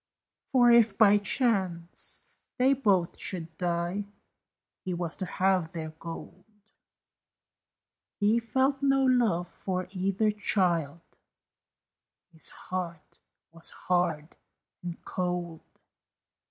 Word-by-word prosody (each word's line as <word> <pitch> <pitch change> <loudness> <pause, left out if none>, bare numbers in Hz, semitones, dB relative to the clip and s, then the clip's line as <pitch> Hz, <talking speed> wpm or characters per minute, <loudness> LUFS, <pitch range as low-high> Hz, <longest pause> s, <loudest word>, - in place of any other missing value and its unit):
For 245 -2 +5
if, 230 -3 +5
by 205 -2 +6
chance, 190 -6 -1 0.4
they 260 +1 +4
both 200 -10 +1
should 165 -3 -5
die, 175 +3 -1 0.8
He 185 -2 -2
was 170 -1 -4
to 185 - -4
have 185 -3 +1
their 160 -2 -5
gold; 165 +1 -9 1.8
He 215 +3 +3
felt 265 +4 +1
no 270 -1 +3
love 225 -9 +2
for 185 +1 -4
either 195 +3 +1
child 175 -7 0 1.3
His 160 - -8
heart 175 -3 -6 0.3
was 165 0 -6
hard 170 -4 0 0.5
and 175 -1 -7
cold. 175 -2 -3
185 Hz, 100 wpm, -29 LUFS, 170-215 Hz, 1.8 s, by